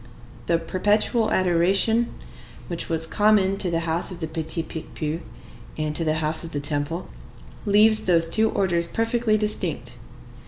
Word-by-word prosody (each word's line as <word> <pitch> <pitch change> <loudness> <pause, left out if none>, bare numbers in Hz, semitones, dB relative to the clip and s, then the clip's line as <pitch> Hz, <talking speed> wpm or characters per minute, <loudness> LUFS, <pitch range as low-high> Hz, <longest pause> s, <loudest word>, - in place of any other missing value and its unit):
The 170 - +3
Perpetual 210 +6 +1
Adoration, 190 +6 +2 0.6
which 170 -1 -4
was 160 -1 +2
common 200 +1 +2
to 190 - -2
the 165 -1 -1
house 165 +1 -1
of 180 -3 -8
the 160 - -3
Petit 160 +1 -3
Picpus 160 0 -5 0.6
and 155 -1 -2
to 165 - 0
the 155 -1 0
house 160 +1 0
of 165 - -8
the 145 - -1
Temple, 145 +4 -2 0.6
leaves 215 +2 +5
those 170 -2 +4
two 220 +6 +2
orders 175 -5 0
perfectly 230 -1 0
distinct. 210 0 -2
170 Hz, 150 wpm, -23 LUFS, 160-210 Hz, 0.6 s, leaves